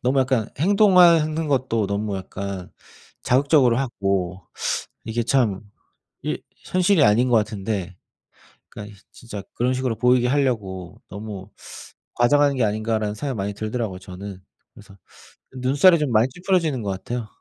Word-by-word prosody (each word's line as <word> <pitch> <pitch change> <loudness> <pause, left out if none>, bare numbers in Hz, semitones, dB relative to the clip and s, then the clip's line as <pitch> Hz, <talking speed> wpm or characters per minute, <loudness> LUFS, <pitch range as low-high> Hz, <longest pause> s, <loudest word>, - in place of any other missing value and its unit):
너무 130 +2 +1
약간 125 -4 0
행동하는 170 -4 +4
것도 125 -6 0
너무 100 0 -2
약간 95 0 -6 0.5
자극적으로 130 -2 +3
하고 95 -7 -2 0.6
이게 115 +1 -2
참 115 -6 +1 0.6
이 - - -2 0.3
현실이 185 -1 +2
아닌 115 +5 +3
것 120 - +5
같은데 100 -3 -3 0.7
그러니까 105 0 -10
진짜 105 -4 -9
그런 125 +2 0
식으로 130 -3 -2
보이게 125 0 +3
하려고 105 -10 -2
'너무 100 -1 -8 0.7
과장하는 140 +3 +3
게 125 - +1
아닌가.'라는 110 0 -1
생각이 130 +3 -4
많이 100 +1 -3
들더라고요, 110 -2 -4
저는. 95 +1 -9 0.3
그래서 100 -3 -16 0.5
그 130 - -13
눈살이 145 +8 +5
좀 150 -4 -1
많이 115 +2 +4
찌푸려지는 165 - 0
것 100 - -2
같아요. 115 +4 -5
115 Hz, 325 characters per minute, -22 LUFS, 100-135 Hz, 0.7 s, 것